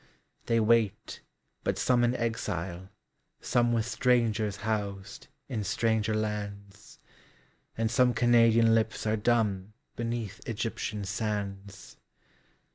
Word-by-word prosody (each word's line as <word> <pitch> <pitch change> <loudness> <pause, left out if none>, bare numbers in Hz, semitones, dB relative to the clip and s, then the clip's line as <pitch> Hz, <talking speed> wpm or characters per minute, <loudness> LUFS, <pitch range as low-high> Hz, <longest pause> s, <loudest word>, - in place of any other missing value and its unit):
They 115 0 +3
wait; 110 -2 +1 0.4
but - - -1
some 125 -1 +2
in 120 +1 +2
exile, 95 -6 -3 0.5
someWith 120 -2 +1
strangers 115 -4 +1
housed, 100 -2 -4 0.2
in 110 -4 -3
stranger 110 0 0
lands; 105 -1 -5 0.8
And 115 0 0
some 125 -2 +3
Canadian 115 -1 +5
lips 110 0 0
are 110 0 +2
dumbBeneath 110 0 -2
Egyptian 110 -1 -3
sands. 100 -2 -5
110 Hz, 95 wpm, -29 LUFS, 100-115 Hz, 0.8 s, Canadian